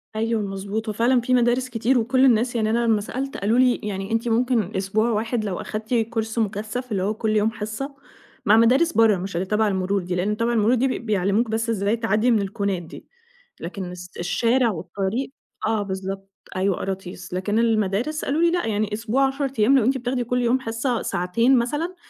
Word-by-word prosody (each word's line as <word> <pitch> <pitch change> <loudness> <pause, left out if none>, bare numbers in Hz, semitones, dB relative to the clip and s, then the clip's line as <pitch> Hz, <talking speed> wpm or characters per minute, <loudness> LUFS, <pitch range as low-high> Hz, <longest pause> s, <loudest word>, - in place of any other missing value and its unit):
أيوه، 225 0 0
مضبوط، 200 +2 -4
هو - - -2
فعلًا 240 +3 +3
في 255 +2 0
مدارس 250 +1 +2
كتير، 245 +2 +1
وكل 255 +3 +3
الناس 240 -1 +3
يعني 220 -2 +1
أنا 235 +2 +1
لمّا 220 -2 +2
سألت 265 +6 -4
قالوا 215 +4 +1
لي 255 -1 +5
يعني 195 0 -4
أنتِ 225 +1 0
ممكن 230 -3 +1
أسبوع 200 +4 +1
واحد 225 0 -1
لو 190 -4 -3
أخدتِ 215 +2 -5
كورس 225 -1 -1
مكثّف 220 +4 -3
اللي 195 -3 0
هو 205 +3 0
كل 220 0 -1
يوم 215 +1 +2
حصّة 220 +7 -5 0.5
مع 210 - +6
مدارس 260 +9 +4
برّا 225 -3 +4
مش 190 +1 -5
اللي 175 +2 -1
تبع 215 +3 +1
المرور 195 0 0
دي، 180 +1 -3
لإن 200 +4 -1
تبع 230 +1 0
المرور 225 +2 +3
دي 255 +2 +2
بي 255 - -2
بيعلموك 210 +1 +1
بس 225 +1 -1
ازاي 205 0 +1
تعدّي 225 +1 +2
من 225 - +4
الكونات 195 -2 -2
دي 165 - -12 0.5
لكن 180 +1 -6
اس 180 0 -9
الشارع 230 +7 +2
والطريق 195 +8 -3 0.4
آه، 220 -1 +1
بالضبط 195 0 -5 0.3
أيوه، 190 0 +1
قراطيس، 185 -2 -6
لكن 205 +4 0
المدارس 225 +6 0
قالوا 295 +4 0
لي 340 0 +4
لأ 355 0 0
يعني 210 -1 -1
أسبوع 235 +5 +1
10 275 +1 -2
ايام 250 +6 +5
لو 255 - +3
أنتِ 265 +2 +2
بتاخدي 250 0 -2
كل 250 +1 -1
يوم 240 +2 +2
حصّة 230 0 -2
ساعتين 230 +9 +2
مثلًا 295 +9 -1
220 Hz, 200 wpm, -23 LUFS, 200-245 Hz, 0.5 s, مع